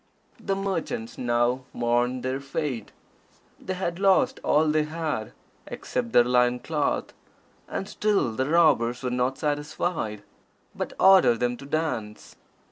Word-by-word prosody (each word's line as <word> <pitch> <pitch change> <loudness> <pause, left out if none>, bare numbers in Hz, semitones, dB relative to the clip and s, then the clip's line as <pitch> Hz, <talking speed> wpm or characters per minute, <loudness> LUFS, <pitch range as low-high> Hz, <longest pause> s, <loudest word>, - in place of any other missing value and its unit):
The 195 - -2
merchants 185 - -3
now 120 +1 +1
mourned 120 +1 0
their 130 +1 -2
fate. 135 -5 -4 0.7
They 185 - -4
had 175 -1 -3
lost 195 -1 +3
all 155 +2 +3
they 155 0 +2
had, 155 -8 -3 0.4
except 120 -2 -4
their 120 - +6
loin 125 0 +2
cloth, 150 +3 -2 0.5
and 195 - -4
still 210 - +1
the 130 +5 -2
robbers 140 -8 +3
were 125 - -1
not 125 +2 0
satisfied, 145 - -2 0.5
but - - -5
ordered 190 -12 +6
them 125 0 0
to 140 - -11
dance. 140 -9 -3
135 Hz, 130 wpm, -26 LUFS, 120-160 Hz, 0.7 s, their